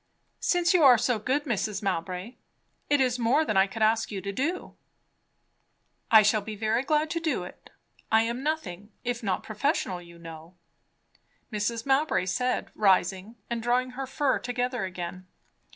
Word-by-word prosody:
"Since 355 0 +2
you 360 - +4
are 255 -3 +8
so 235 0 0
good, 265 +7 0
Mrs. 215 -5 -2
Mowbray 185 +4 -3 0.5
it 290 - +3
is 250 -1 +1
more 260 +7 +3
than 215 - -1
I 190 +1 +5
could 220 +3 -3
ask 220 +1 +2
you 200 - -4
to 200 +2 -4
do 315 - -3 0.7
" - - -46
"I 220 -1 +8
shall 210 +1 +3
be 215 +1 -7
very 220 +3 0
glad 305 +3 0
to 335 - -1
do 315 - -1
it. 180 - -12 0.4
I 220 0 +5
am 235 +2 -3
nothing 220 - -4
if 245 0 -2
not 195 -5 -1
professional, 215 - -1
you 170 -1 -14
know," 165 +1 -11 1.0
Mrs. 225 +2 -2
Mowbray 275 -5 +2
said 250 +7 -1
rising 190 +1 +1
and 235 -1 -3
drawing 250 +2 +1
her 265 +1 -5
fur 270 0 0
together 245 -2 -2
again. 185 0 -7
225 Hz, 170 wpm, -27 LUFS, 195-260 Hz, 1.0 s, are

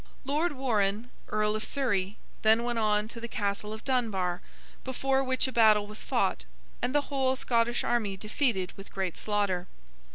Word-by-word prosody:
Lord 300 +4 +1
Warrenne, 225 -4 0 0.2
Earl 210 0 +1
of 215 - -2
Surrey, 205 -8 0 0.2
then 220 +2 +4
went 240 -1 -1
on 210 -1 +2
to 230 - -8
the 235 - -4
Castle 205 -1 -2
of 220 +1 -7
Dunbar, 200 -9 0 0.4
before 270 +1 0
which 260 0 +1
a - - -4
battle 215 -3 +5
was 210 +1 -9
fought, - - 0 0.4
and 250 +3 -1
the 290 - +5
whole 265 -2 0
Scottish 240 -2 +1
army 215 -5 0
defeated 210 -2 0
with 195 - -11
great 190 -3 -2
slaughter. 200 -4 0
220 Hz, 165 wpm, -29 LUFS, 205-255 Hz, 0.4 s, battle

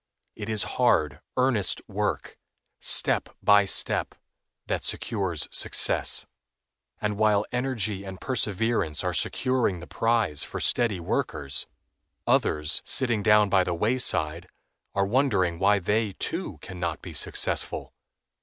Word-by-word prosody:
It 105 - -6
is 110 -2 -1 0.2
hard, 75 - +2 0.2
earnest 125 -7 +1
work, - - -3 0.4
step - - +1
by 105 0 +6
step, 95 - +1 0.5
that - - -2
secures 95 -8 -2
success; - - +3 0.7
and 105 -1 -2
while 105 -1 +3
energy 115 -6 -2
and 95 -1 -8
perseverance 110 - -1
are - - -1
securing 125 -8 +1
the 85 - -9
prize 115 -11 0
for - - -5
steady 115 -6 +1
workers, 70 -4 -2 0.6
others, 75 -1 +1
sitting 120 -5 0
down 105 0 +5
by 95 -2 +3
the 90 -1 -2
wayside, 90 -6 +1 0.5
are 100 0 +2
wondering 100 -8 +1
why 100 +2 +4
they, 105 +2 0
too, - - -4
can 90 - -8
not 85 -1 -3
be - - -8
successful. - - 0
105 Hz, 125 wpm, -26 LUFS, 90-115 Hz, 0.7 s, by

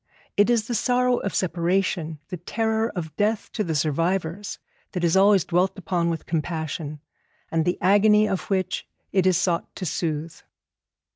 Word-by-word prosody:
It 205 +3 +4
is 230 -3 +2
the 240 - -3
sorrow 250 +1 +2
of 200 - -3
separation, 175 -2 0
the 180 - -4
terror 220 +5 -1
of 160 -4 -5
death 210 +1 0
to 215 - -1
the 165 -4 -2
survivors, 165 +5 -1 0.4
that 180 - -2
is 170 0 +3
always 195 -1 +5
dwelt 180 +3 +1
upon 175 -3 0
with 165 -2 -3
compassion, 160 -2 -3 0.5
and 160 -1 +1
the 180 - +1
agony 210 +3 +5
of 190 - -3
which 185 -2 -1 0.2
it 185 -1 +3
is 185 -2 +4
sought 175 -2 -1
to 185 - -5
soothe. 160 -1 -2
185 Hz, 160 wpm, -24 LUFS, 165-205 Hz, 0.5 s, always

